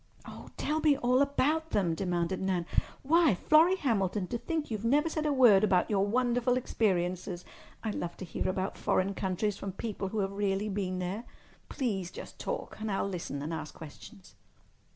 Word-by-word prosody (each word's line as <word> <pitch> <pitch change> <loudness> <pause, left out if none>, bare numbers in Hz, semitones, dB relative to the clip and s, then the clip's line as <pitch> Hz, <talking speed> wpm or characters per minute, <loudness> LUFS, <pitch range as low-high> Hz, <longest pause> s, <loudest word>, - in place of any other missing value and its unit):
"Oh, - - -10
tell 305 +1 0
me 300 -3 +4
all 250 +1 +3
about 300 +3 +1
them," 185 - +1
demanded 180 0 -1
Nan. 185 -3 0 0.4
"Why, 315 - +4
Florrie 315 - +5
Hamilton, 205 - 0
to 235 - -2
think 315 -2 -3
you've 215 -1 -3
never 290 +7 +3
said 310 -1 -1
a - - +2
word 240 -8 +6
about 190 -1 +3
your 195 -2 +3
wonderful 245 +2 +2
experiences! 180 -6 -1 0.4
I 220 - -1
love 175 -4 -4
to 185 - -6
hear 170 - -2
about 190 +1 -2
foreign 190 +1 +1
countries 195 +2 -1
from 195 -2 -5
people 205 -1 -4
who 220 - -4
have 195 0 -1
really 200 +1 -1
been 190 -2 -2
there. 185 +6 -3 0.4
Please 200 - -2
just - - -10
talk—and 220 - -4
I'll 195 - 0
listen 170 -7 -4
and 160 +3 -4
ask 155 -1 -6
questions." 185 +6 -12
205 Hz, 175 wpm, -30 LUFS, 185-255 Hz, 0.4 s, word